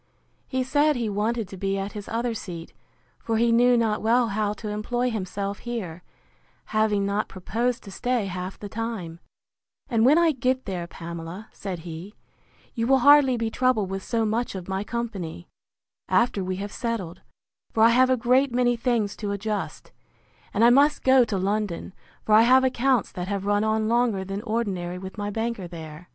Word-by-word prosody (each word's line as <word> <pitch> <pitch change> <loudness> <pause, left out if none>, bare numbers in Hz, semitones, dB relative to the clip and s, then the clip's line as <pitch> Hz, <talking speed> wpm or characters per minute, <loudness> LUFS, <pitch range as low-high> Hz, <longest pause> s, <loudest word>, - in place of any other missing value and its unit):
He 260 -1 -1
said 290 +3 +2
he 235 -3 -1
wanted 215 +2 -1
to 190 - -9
be 195 +1 -1
at 195 +1 -3
his 205 -2 -8
other 235 +1 -1
seat, 175 -6 -7 0.5
for 225 -1 -1
he 235 +1 +3
knew 245 +1 +5
not 225 -2 +1
well 235 +2 +3
how 210 0 0
to 210 0 -7
employ 240 +4 -1
himself 200 -1 -4
here, 195 -9 -5 0.7
having 215 -2 +2
not 200 +2 -1
proposed 235 +6 -2
to 200 - -10
stay 245 +2 -1
half 185 0 -5
the 205 - -7
time: 205 -6 -5 0.7
And 230 -3 +2
when 280 +6 +6
I 340 -1 +4
get 255 -1 -1
there, 180 -4 -4
Pamela, 170 +5 -8
said 190 -4 -5
he, 170 +5 -8 0.6
you 230 -1 -1
will 270 +1 +5
hardly 285 -3 +7
be 225 -1 -2
troubled 225 -7 +1
with 195 0 -3
so 225 +2 -1
much 225 +1 -1
of 185 -2 -6
my 190 +1 -2
company, 205 -8 -5 0.6
after 225 -5 +2
we 185 0 -2
have 200 +2 -5
settled; 195 -7 -4 0.5
for 220 - +3
I 230 - +8
have 255 +2 +4
a 255 - +3
great 255 +3 +3
many 245 0 +2
things 230 -4 0
to 210 - -4
adjust: 205 0 -4 0.6
And 210 - +1
I 235 - +7
must 285 +3 +4
go 260 -1 +6
to 210 -3 -2
London; 195 -1 -2 0.3
for 215 - +2
I 215 - +8
have 255 +3 +6
accounts 260 -2 +1
that 180 0 -5
have 200 -1 -3
run 205 +1 +2
on 220 0 +1
longer 230 -4 +1
than 195 +2 -4
ordinary 200 -6 -2
with 190 +3 -8
my 205 0 -2
banker 225 -3 -3
there. 160 0 -10
215 Hz, 185 wpm, -25 LUFS, 195-240 Hz, 0.7 s, I